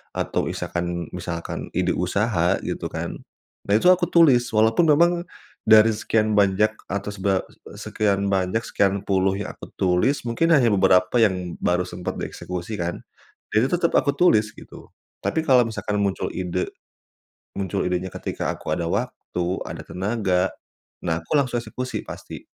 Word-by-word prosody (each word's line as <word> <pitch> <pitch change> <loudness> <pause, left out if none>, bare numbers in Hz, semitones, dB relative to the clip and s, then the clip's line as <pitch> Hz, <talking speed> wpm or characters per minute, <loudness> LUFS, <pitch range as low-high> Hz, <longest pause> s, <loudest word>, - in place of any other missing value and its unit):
atau - - -1
isakan 85 -1 -3
misalkan 85 -1 -5
ide 90 -1 +1
usaha 90 -1 +1
gitu - - -4
kan, - - -4 0.5
nah, 100 - 0
itu - - +2
aku 180 -1 +2
tulis 140 -8 +6
walaupun 110 +8 +3
memang 170 +4 +5 0.5
dari 110 0 +7
sekian 110 0 +1
banyak 100 +1 +3 0.2
atas 100 +1 -3
ba 95 -1 +2 0.3
eee, - - -12
sekian 100 -2 0
banyak, 95 +2 +1
sekian 100 0 +1
puluh 95 0 +2
yang 105 - -4
aku - - -12
tulis, 95 +11 +2
mungkin 165 +9 +1
hanya 125 -4 +4
beberapa 95 +1 +3
yang 90 -5 +1
baru 90 0 +1
sempat 90 0 -5
dieksekusi 90 +4 -5
kan, 85 0 -3 0.6
ya 110 - +5
itu 130 - +1
tetap 170 - +1
aku 140 - +3
tulis 110 -12 +4
gitu, - - -13 0.3
tapi - - 0
kalau 125 -2 +6
misalkan 105 -2 -3
muncul 100 -1 -1
ide 90 0 -2 0.9
muncul 100 0 -1
idenya 90 +1 -1
ketika - - -4
aku - - -4
ada 85 -2 -2
waktu, 100 -4 -3 0.2
ada - - -6
tenaga, 95 -2 0 0.5
nah 80 -1 -1
aku 80 - -6
langsung 125 -4 +1
eksekusi 125 +1 -5
pasti. - - -9
100 Hz, 155 wpm, -23 LUFS, 90-115 Hz, 0.9 s, dari